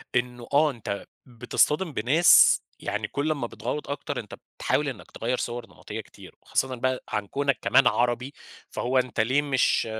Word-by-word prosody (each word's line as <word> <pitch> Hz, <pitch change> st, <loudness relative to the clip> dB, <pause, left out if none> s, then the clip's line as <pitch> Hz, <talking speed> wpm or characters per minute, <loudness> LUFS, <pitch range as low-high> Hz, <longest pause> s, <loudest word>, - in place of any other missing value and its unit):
إنه 120 Hz, -1 st, -1 dB
آه 150 Hz, +1 st, +4 dB
أنت 105 Hz, -5 st, -5 dB, 0.2 s
بتصطدم 145 Hz, +7 st, 0 dB
بناس 140 Hz, +10 st, +6 dB, 0.2 s
يعني -, -, -3 dB
كُلّ 145 Hz, +2 st, -1 dB
ما 140 Hz, -6 st, -4 dB
بتْغوّط 130 Hz, +5 st, -5 dB
أكتر، 140 Hz, -1 st, -4 dB
أنت 105 Hz, -, -8 dB, 0.2 s
بتحاول 145 Hz, 0 st, 0 dB
إنك 125 Hz, -, -10 dB
تغيّر 120 Hz, +3 st, -2 dB
صور 120 Hz, -1 st, -4 dB
نمطية -, -, -8 dB
كتير -, -, -15 dB
وخاصةً 130 Hz, -1 st, -1 dB
بقى 130 Hz, +1 st, -1 dB
عن 105 Hz, -2 st, -2 dB
كوْنك 140 Hz, +2 st, 0 dB
كمان 130 Hz, -, +4 dB
عربي، 120 Hz, +3 st, 0 dB, 0.4 s
فهو 130 Hz, +2 st, -1 dB
أنت 125 Hz, -2 st, 0 dB
ليه 130 Hz, +6 st, +3 dB
مش 135 Hz, -5 st, +2 dB
130 Hz, 160 wpm, -26 LUFS, 120-140 Hz, 0.4 s, بناس